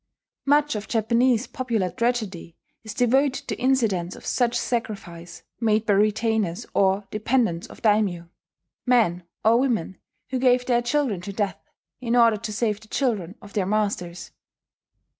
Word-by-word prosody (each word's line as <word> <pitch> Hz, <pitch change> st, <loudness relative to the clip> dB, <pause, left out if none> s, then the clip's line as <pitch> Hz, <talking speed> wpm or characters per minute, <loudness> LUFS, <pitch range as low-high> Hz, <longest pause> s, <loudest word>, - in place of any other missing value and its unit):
Much 295 Hz, +1 st, +3 dB
of 210 Hz, -1 st, -5 dB
Japanese 235 Hz, +2 st, +2 dB
popular 230 Hz, -9 st, -2 dB
tragedy 210 Hz, -6 st, -2 dB, 0.3 s
is 220 Hz, -1 st, -8 dB
devoted 270 Hz, +3 st, +2 dB
to -, -, -2 dB
incidents 225 Hz, -9 st, +1 dB
of -, -, -13 dB
such 240 Hz, -1 st, +1 dB
sacrifice 185 Hz, -9 st, -4 dB, 0.2 s
made 220 Hz, -1 st, +2 dB
by 210 Hz, -, +3 dB
retainers 215 Hz, -1 st, +1 dB
or 195 Hz, +1 st, +2 dB
dependents 215 Hz, -5 st, 0 dB
of -, -, -15 dB
daimyo, 205 Hz, -6 st, +2 dB, 0.6 s
men 220 Hz, -9 st, +3 dB, 0.2 s
or 230 Hz, +2 st, +5 dB
women 225 Hz, -9 st, -1 dB, 0.3 s
who 260 Hz, -, 0 dB
gave 250 Hz, -1 st, +3 dB
their 240 Hz, -1 st, +2 dB
children 245 Hz, -6 st, 0 dB
to 200 Hz, -, -6 dB
death 195 Hz, -5 st, -3 dB, 0.4 s
in 240 Hz, -1 st, -1 dB
order 230 Hz, -3 st, +5 dB
to 215 Hz, -, -5 dB
save 210 Hz, -1 st, -1 dB
the 220 Hz, -, -16 dB
children 215 Hz, -8 st, -1 dB
of 205 Hz, -, -13 dB
their 195 Hz, -3 st, 0 dB
masters. 195 Hz, -4 st, -2 dB
220 Hz, 145 wpm, -24 LUFS, 195-245 Hz, 0.6 s, or